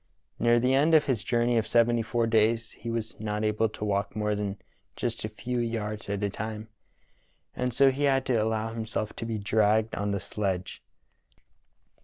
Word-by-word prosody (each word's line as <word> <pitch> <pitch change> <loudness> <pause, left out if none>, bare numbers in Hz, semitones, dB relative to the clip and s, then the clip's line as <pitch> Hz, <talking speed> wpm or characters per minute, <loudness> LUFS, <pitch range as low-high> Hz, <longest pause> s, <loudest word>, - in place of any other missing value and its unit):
Near 120 0 +4
the 125 +2 +2
end 150 +4 +4
of 150 - +5
his 125 -6 0
journey 120 -1 +2
of 110 - -3
seventy 120 0 +3
four 115 +1 0
days 115 +1 +2
he 115 - -8
was 115 -1 -3
not 105 0 -2
able 110 +1 +1
to 105 - -6
walk 100 0 -1
more 105 -1 0
than 105 -1 -3 0.4
a 120 - +1 0.2
few 120 +3 -3
yards 110 -2 -3
at 100 0 -2
a 100 - +1
time, 110 +1 -5 0.9
and 125 0 -1
so 135 +3 +5
had 135 -1 +1
to 130 - +1
allow 110 0 -1
himself 110 -1 -3
to 115 - -4
be 115 -1 -2
dragged 105 +1 +2
on 100 0 -2
the 100 0 -1
sledge. 95 -1 -3
110 Hz, 180 wpm, -28 LUFS, 105-120 Hz, 0.9 s, of